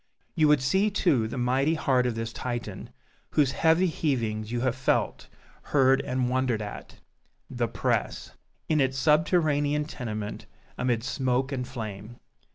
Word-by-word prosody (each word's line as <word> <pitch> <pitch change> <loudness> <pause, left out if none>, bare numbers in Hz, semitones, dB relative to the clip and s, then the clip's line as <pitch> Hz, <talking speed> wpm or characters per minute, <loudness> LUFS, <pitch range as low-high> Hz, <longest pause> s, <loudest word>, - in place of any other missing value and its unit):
You 155 -3 +3
would 150 -3 +4
see, 190 +10 +2
too, 155 - +2
the 115 - -6
mighty 130 +6 +1
heart 130 -5 +2
of 120 - -2
this 115 +1 -4
Titan, 120 -6 -5 0.4
whose 140 -4 +2
heavy 165 +6 +3
heavings 115 -10 -1
you 120 -1 -1
have 130 -1 0
felt, 130 0 0 0.3
heard 135 -1 +3
and 125 0 -1
wondered 125 -2 0
at 105 -1 -8 0.6
THE - - -1
PRESS - - -2 0.4
in 155 -2 +2
its 130 0 0
subterranean 150 -1 +2
tenement, 110 -7 -6 0.3
amid 120 -3 0
smoke 130 0 0
and 125 -2 -3
flame. 110 -3 -7
130 Hz, 145 wpm, -27 LUFS, 120-150 Hz, 0.6 s, would